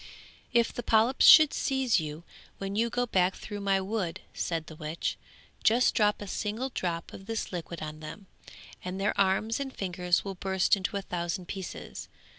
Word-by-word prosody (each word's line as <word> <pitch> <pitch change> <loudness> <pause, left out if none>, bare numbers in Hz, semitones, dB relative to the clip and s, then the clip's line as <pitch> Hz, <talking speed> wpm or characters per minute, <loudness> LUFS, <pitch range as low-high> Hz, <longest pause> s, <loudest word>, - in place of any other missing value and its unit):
'If 235 -1 +3
the - - -4
polyps 230 +3 +4
should 310 -2 +9
seize 265 -6 +1
you, 155 +1 -6 0.3
when 195 0 -4
you 230 +2 +2
go 245 +1 0
back 185 -4 +2
through 205 -1 -7
my 195 -1 +2
wood,' 190 -3 -2
said 165 -2 -2
the 160 - -10
witch, 155 +1 -3 0.5
'just 240 +3 +4
drop 210 -1 +2
a - - -8
single 215 +7 -2
drop 170 -8 -3
of 195 - -11
this 225 -1 -3
liquid 170 -2 -5
on 155 0 -6
them, 155 +6 -9 0.6
and 185 +1 -4
their 200 - +1
arms 200 +4 +2
and 275 -1 -3
fingers 180 -4 0
will 195 - -3
burst 190 +1 +2
into 200 +1 -3
a 200 - -4
thousand 175 0 -3
pieces.' 190 -3 -7
195 Hz, 180 wpm, -29 LUFS, 175-220 Hz, 0.6 s, should